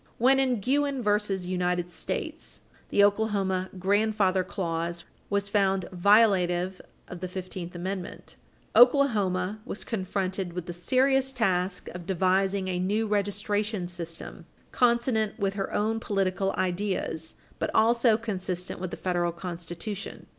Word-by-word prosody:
When, 265 +3 +4
in 255 -4 +2
Guinn 275 +3 0
v. 210 -1 +1
United 180 -1 -1
States, - - -4
supra, - - -14
the 200 - +4
Oklahoma 200 -3 +1
"grandfather 200 0 +2
clause" 170 -2 -3 0.3
was 200 0 0
found 195 -2 +1
violative 185 -2 +3 0.3
of 180 - -8
the 185 - -4
Fifteenth 180 -1 -6
Amendment, 185 +1 -5 0.4
Oklahoma 215 -7 +4
was 205 - -6
confronted 190 -3 -2
with 180 -1 -4
the 175 - -5
serious 265 +8 +2
task 190 -7 0
of 175 -1 -9
devising 190 +1 +1
a 180 -1 -1
new 205 +5 +1
registration 205 -1 -1
system 170 -2 -7 0.2
consonant 235 -3 +2
with 195 -3 0
her 195 -1 -3
own 220 +2 0
political 195 -2 0
ideas 180 -3 -2 0.2
but - - -1
also 230 0 +4
consistent 185 -5 -4
with 185 0 -3
the - - -6
Federal 175 -2 0
Constitution. 175 +3 -6
195 Hz, 130 wpm, -27 LUFS, 180-215 Hz, 0.4 s, When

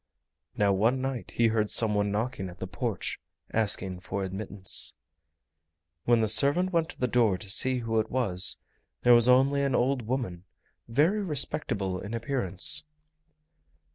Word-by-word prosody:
Now 100 -1 +2
one 115 +7 +1
night 130 -2 -4
he 115 -1 +3
heard 110 -1 0
some 110 -2 +1
one 105 0 0
knocking 105 -2 -3
at 90 - -13
the - - -6
porch, 100 +2 -4 0.3
asking 100 -4 +1
for 95 +2 -5
admittance. 95 0 -2 1.1
When 120 -1 +3
the 110 - +1
servant 145 - +3
went 165 -1 +1
to - - -12
the 125 - +1
door 115 -5 +2
to 105 - -7
see 130 +4 +3
who 115 -1 -1
it 110 - -2
was, 100 -8 +3 0.5
there 120 - +6
was 120 +1 +5
only 135 +3 +4
an 140 -2 0
old 130 +1 +1
woman, 115 -9 -3 0.4
very 155 - +1
respectable 125 - -1
in 105 +4 -6
appearance. 115 -7 0
115 Hz, 155 wpm, -27 LUFS, 100-130 Hz, 1.1 s, there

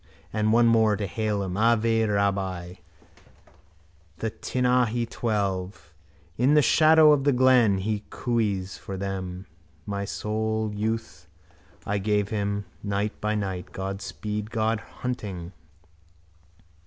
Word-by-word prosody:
And 110 0 +1
one 120 +1 +5
more 110 -2 +4
to 100 0 -3
hail 105 +1 -1
him: 90 -1 -4
ave, 115 +1 +3
rabbi: 95 -4 -1 1.4
the 110 +5 -3
Tinahely 125 -2 +1
twelve. 100 -6 -3 0.5
In 135 +5 +4
the 150 - +5
shadow 155 +3 +6
of 140 -2 +1
the 145 - +4
glen 125 -5 +4
he 105 +2 -2
cooees 105 -6 -1
for 95 - -6
them. 95 -1 -4 0.4
My 100 -1 -3
soul's 110 +1 -2
youth 105 -6 -3 0.6
I 100 0 -1
gave 105 0 0
him, 100 -1 -2 0.2
night 100 +1 -2
by 105 0 0
night. 95 -3 -4
God 95 +1 -4
speed. 105 0 -5
Good 110 0 0
hunting. 100 -8 -6
105 Hz, 120 wpm, -26 LUFS, 100-115 Hz, 1.4 s, shadow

